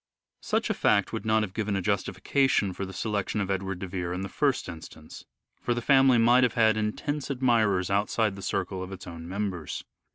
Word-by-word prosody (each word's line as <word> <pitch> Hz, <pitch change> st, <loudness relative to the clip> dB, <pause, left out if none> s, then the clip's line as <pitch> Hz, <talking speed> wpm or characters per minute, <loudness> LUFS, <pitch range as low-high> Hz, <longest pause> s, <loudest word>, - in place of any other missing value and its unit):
Such -, -, 0 dB
a -, -, +2 dB
fact 100 Hz, +1 st, +2 dB
would 110 Hz, -1 st, -4 dB
not 110 Hz, 0 st, +3 dB
have 95 Hz, -3 st, -5 dB
given 105 Hz, -2 st, -1 dB
a 95 Hz, -, 0 dB
justification 100 Hz, +3 st, +1 dB
for -, -, -9 dB
A -, -, -1 dB
significant -, -, -8 dB
the 95 Hz, -1 st, -8 dB
selection 105 Hz, -1 st, -1 dB
of 100 Hz, -1 st, -2 dB
Edward 95 Hz, -1 st, -2 dB
de 95 Hz, -, -6 dB
Vere 90 Hz, -1 st, -3 dB
in 90 Hz, -, -3 dB
the 95 Hz, -, -4 dB
first 140 Hz, -3 st, 0 dB
instance; 80 Hz, -1 st, -10 dB
silence -, -, -13 dB, 0.4 s
for 120 Hz, -, 0 dB
the -, -, -1 dB
family 135 Hz, -2 st, +5 dB
might 120 Hz, +2 st, +5 dB
have 125 Hz, -, +1 dB
had 110 Hz, -2 st, +4 dB
intense 130 Hz, +8 st, -2 dB
admirers 110 Hz, -8 st, +2 dB
outside 105 Hz, +1 st, +1 dB
the 100 Hz, -, -9 dB
circle 95 Hz, 0 st, -2 dB
of 95 Hz, +1 st, -6 dB
its 95 Hz, -1 st, -8 dB
own 85 Hz, -2 st, -8 dB
members. 95 Hz, -4 st, -4 dB
100 Hz, 225 wpm, -27 LUFS, 95-115 Hz, 0.4 s, family